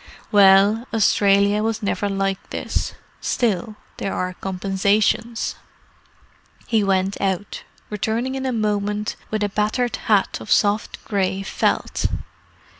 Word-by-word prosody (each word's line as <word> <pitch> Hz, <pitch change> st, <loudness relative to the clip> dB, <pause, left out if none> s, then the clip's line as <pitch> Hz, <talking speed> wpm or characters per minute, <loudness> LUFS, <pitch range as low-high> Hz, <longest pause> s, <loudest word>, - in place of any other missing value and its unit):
Well, 205 Hz, +3 st, +5 dB
Australia 200 Hz, -2 st, +3 dB
was 225 Hz, 0 st, -2 dB
never 205 Hz, 0 st, -1 dB
like 195 Hz, -1 st, -2 dB
this. -, -, -3 dB, 0.2 s
Still, 215 Hz, -3 st, -1 dB, 0.2 s
there 195 Hz, -, -3 dB
are 185 Hz, 0 st, -2 dB
compensations." 200 Hz, +5 st, 0 dB, 1.1 s
He 220 Hz, -3 st, +2 dB
went 195 Hz, 0 st, 0 dB
out, 195 Hz, 0 st, -2 dB, 0.3 s
returning 225 Hz, +5 st, -1 dB
in 265 Hz, 0 st, -3 dB
a -, -, 0 dB
moment 210 Hz, -2 st, -1 dB
with 215 Hz, -1 st, -1 dB
a 205 Hz, -, 0 dB
battered 215 Hz, +4 st, 0 dB
hat 205 Hz, -3 st, +1 dB
of -, -, -10 dB
soft 205 Hz, +1 st, +1 dB
grey 195 Hz, -1 st, -1 dB
felt. -, -, 0 dB
205 Hz, 115 wpm, -22 LUFS, 195-220 Hz, 1.1 s, Well